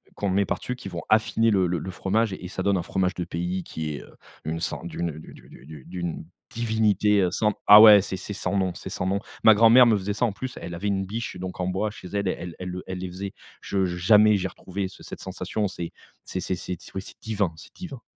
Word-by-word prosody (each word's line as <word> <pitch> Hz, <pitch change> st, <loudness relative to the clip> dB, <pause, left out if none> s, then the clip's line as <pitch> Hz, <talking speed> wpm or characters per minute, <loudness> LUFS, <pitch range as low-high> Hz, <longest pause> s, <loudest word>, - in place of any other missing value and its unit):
qu'on 100 Hz, -, -2 dB
met 100 Hz, +1 st, +2 dB
par -, -, -2 dB
dessus, 125 Hz, -, -4 dB
qui 100 Hz, -6 st, -8 dB
vont 85 Hz, -1 st, -5 dB
affiner 110 Hz, +1 st, +3 dB
le 95 Hz, -3 st, +3 dB
le 85 Hz, 0 st, -1 dB
le 95 Hz, -, -6 dB
fromage 100 Hz, +3 st, 0 dB
et 90 Hz, -1 st, -7 dB
ça 95 Hz, -, -4 dB
donne 100 Hz, -1 st, +2 dB
un -, -, -1 dB
fromage 95 Hz, 0 st, 0 dB
de 90 Hz, -, -3 dB
pays 90 Hz, +2 st, -3 dB
qui 80 Hz, -2 st, -5 dB
est, -, -, -7 dB
heu, -, -, -17 dB, 0.3 s
une 80 Hz, +1 st, -2 dB
so -, -, -2 dB
d'une, 85 Hz, 0 st, -3 dB
heu, 75 Hz, -, -10 dB
d'u -, -, -12 dB
d'u -, -, -15 dB
d'u 75 Hz, -3 st, -11 dB
d'une 85 Hz, -2 st, -5 dB, 0.3 s
divinité, 105 Hz, -3 st, +2 dB
heu, 90 Hz, -, +1 dB
sans 105 Hz, -1 st, +1 dB
ah 105 Hz, +1 st, +11 dB
ouais, 105 Hz, -3 st, +10 dB
c'est 95 Hz, -, -4 dB
c'est 105 Hz, +2 st, -6 dB
sans 100 Hz, -, -2 dB
nom 95 Hz, -2 st, 0 dB
c'est -, -, -7 dB
sans 90 Hz, -, -3 dB
nom. 100 Hz, +1 st, +1 dB, 0.2 s
Ma 110 Hz, -2 st, +8 dB
grand-mère 115 Hz, +3 st, +7 dB
me 110 Hz, -3 st, +4 dB
faisait 100 Hz, +1 st, -3 dB
ça 120 Hz, +4 st, +1 dB
en 105 Hz, -, -1 dB
plus, 130 Hz, +4 st, -6 dB
elle 85 Hz, -, -6 dB
avait 100 Hz, +4 st, -3 dB
une 95 Hz, -1 st, 0 dB
biche 110 Hz, -1 st, -5 dB
donc 90 Hz, 0 st, -6 dB
en 90 Hz, -, -1 dB
bois 95 Hz, +3 st, -1 dB
chez 95 Hz, -, -11 dB
elle, 100 Hz, -1 st, -2 dB
elle 85 Hz, -2 st, -4 dB
elle 90 Hz, 0 st, -5 dB
le 90 Hz, 0 st, -6 dB
elle 95 Hz, -1 st, -5 dB
les 95 Hz, -, -4 dB
faisait, 95 Hz, +2 st, -6 dB, 0.3 s
je 95 Hz, -1 st, 0 dB
jamais 105 Hz, +4 st, +4 dB
j'ai 95 Hz, 0 st, -2 dB
retrouvé 95 Hz, +1 st, -5 dB
ce -, -, -15 dB
cette -, -, -9 dB
sensation, 105 Hz, -2 st, -3 dB
c'est 85 Hz, -2 st, -6 dB, 0.3 s
c'est 95 Hz, -, -4 dB
c'est 95 Hz, -, -2 dB
c'est 90 Hz, 0 st, -5 dB, 0.2 s
ouais 95 Hz, -, -2 dB
c'est -, -, -13 dB
divin, 100 Hz, -6 st, -1 dB
c'est -, -, -14 dB
divin. 140 Hz, -10 st, -8 dB
95 Hz, 260 wpm, -25 LUFS, 90-105 Hz, 0.3 s, ah